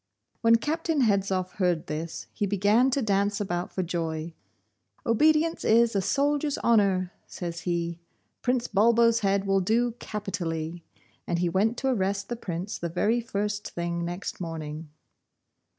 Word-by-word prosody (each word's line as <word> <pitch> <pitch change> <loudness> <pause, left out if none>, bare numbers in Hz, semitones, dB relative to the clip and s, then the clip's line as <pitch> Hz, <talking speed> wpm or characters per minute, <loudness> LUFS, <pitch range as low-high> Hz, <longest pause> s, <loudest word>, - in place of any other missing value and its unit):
When 230 0 +6
Captain 315 +4 0
Hedzoff 195 -4 +1
heard 180 -4 +1
this, 160 +2 -5
he 205 - -1
began 205 +6 +3
to 270 0 0
dance 200 0 +1
about 175 -3 -2
for 185 - -2
joy. 165 -1 -3 0.7
'Obedience 310 +7 +3
is 230 0 +4
a 195 - +3
soldier's 285 +6 +1
honour,' 195 -5 +3 0.2
says 170 -1 -5
he. 170 -1 -2 0.4
'Prince 250 -1 +1
Bulbo's 230 +2 +4
head 200 -1 +1
will 195 0 +2
do 235 +6 +2
capitally,' 170 -5 -4 0.5
and 175 - 0
he 175 0 +1
went 215 +7 +1
to 270 - -1
arrest 200 -5 0
the 240 - -2
Prince 185 -1 -5
the 170 - -3
very 210 +8 +1
first 205 -2 -3
thing 170 0 -2
next 175 +2 -5
morning. 160 -2 -5
200 Hz, 145 wpm, -27 LUFS, 175-230 Hz, 0.7 s, When